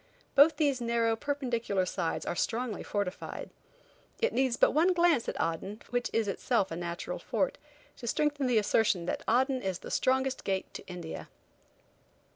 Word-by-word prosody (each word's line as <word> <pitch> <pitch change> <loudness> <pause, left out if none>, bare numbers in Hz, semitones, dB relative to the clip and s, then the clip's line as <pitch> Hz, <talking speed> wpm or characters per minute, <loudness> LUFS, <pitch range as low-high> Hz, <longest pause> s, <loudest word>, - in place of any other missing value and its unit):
Both 285 +4 +6
these 280 -5 +1
narrow, 230 -1 +2
perpendicular 235 -8 -1
sides 170 -2 -2
are 175 - -2
strongly 230 +2 -1
fortified. 200 -3 -4 0.7
It 470 +1 +1
needs 260 -3 +1
but - - +5
one 335 +5 +4
glance 340 -8 +3
at - - -5
Aden, 180 +6 -2
which 245 0 0
is 225 -2 +1
in 195 - 0
itself 205 -6 0
a - - -2
natural 170 0 -4
fort, - - -1 0.4
to 235 - -7
strengthen 290 +1 +1
the 245 -2 +3
assertion 205 -4 +2
that - - -2
Aden 260 +3 +2
is 190 -3 -2
the - - -9
strongest 265 0 +1
gate 190 -1 -2
to - - -9
India. 175 -3 -7
235 Hz, 165 wpm, -30 LUFS, 195-270 Hz, 0.7 s, Both